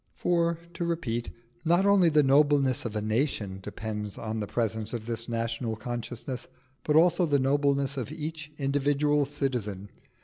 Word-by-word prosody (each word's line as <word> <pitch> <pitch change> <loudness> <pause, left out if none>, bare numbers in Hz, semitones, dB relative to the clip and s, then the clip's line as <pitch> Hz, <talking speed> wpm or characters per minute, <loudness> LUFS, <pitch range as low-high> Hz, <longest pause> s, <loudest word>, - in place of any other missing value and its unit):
For, 170 -1 +1 0.2
to 170 - -3
repeat, 140 -9 -2 0.3
not 175 +4 +3
only 200 -4 +5
the 150 -1 +4
nobleness 140 -2 +3
of 110 -2 -4
a 105 - -1
nation 110 -4 -1
depends 105 0 -5
on 110 0 -3
the 105 - -3
presence 110 -1 -2
of 115 -2 -4
this 115 0 -2
national 115 0 -2
consciousness, 120 +2 -5 0.4
but 150 - +1
also 175 +2 +5
the 145 -2 +3
nobleness 140 0 +1
of 130 +1 -3
each 155 -1 -5
individual 145 +1 +1
citizen. 115 -9 -3
135 Hz, 150 wpm, -28 LUFS, 115-150 Hz, 0.4 s, only